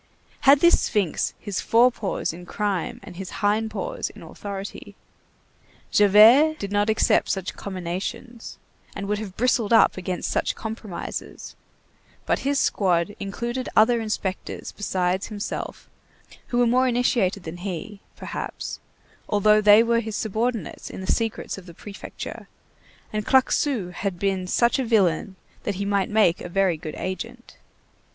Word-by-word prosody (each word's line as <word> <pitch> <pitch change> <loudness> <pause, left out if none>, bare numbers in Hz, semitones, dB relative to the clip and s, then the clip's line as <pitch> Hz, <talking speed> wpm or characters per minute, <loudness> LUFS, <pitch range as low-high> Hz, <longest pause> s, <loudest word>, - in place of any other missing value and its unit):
Had 280 0 +7
this 345 0 +6
sphinx 200 -7 0
his 205 -3 -3
fore 240 +2 +5
paws 205 -7 -3
in 175 +1 -11
crime 205 +2 -2
and 180 -4 -11
his 190 -1 -6 0.2
hind 215 +2 +2
paws - - -4
in - - -13
authority? 200 -1 -8 1.0
Javert 225 +10 +7
did 200 -6 -5
not 205 +1 +1
accept 220 - +3
such 190 -2 -2
comminations, 190 +5 -6 0.4
and 200 0 -4
would 210 0 -1
have 200 -4 -7
bristled 235 -2 +1
up 225 - +5
against 185 -1 -3
such - - 0
compromises; 220 -4 -6 0.7
but - - +1
his 280 +1 0
squad 185 -4 +1
included 240 +6 -4
other 230 +2 +5
inspectors 205 -4 -4
besides 185 -2 -1
himself, 210 -2 -5 0.6
who 240 - -2
were 245 - +4
more 255 +2 +3
initiated 235 -6 +1
than 165 +1 -7
he, 195 +3 -6 0.2
perhaps, - - -6 0.5
although 210 +1 +4
they 210 +2 +7
were 235 0 +2
his 220 -2 -4
subordinates 225 +2 -2
in - - -8
the 190 - 0
secrets 225 -3 -2
of 190 - -15
the 170 - -12
Prefecture, 205 +2 -8 0.7
and 215 0 -1
Claquesous 255 -6 +2
had 195 -3 -2
been 190 -1 -1
such 235 +7 +2
a - - +1
villain 195 -5 +1 0.3
that 205 - -3
he 200 +2 -3
might 200 -1 +1
make 210 -6 +3
a - - -6
very 190 -1 +2
good 155 -1 -7
agent. 230 +6 -6
205 Hz, 145 wpm, -24 LUFS, 190-230 Hz, 1.0 s, Had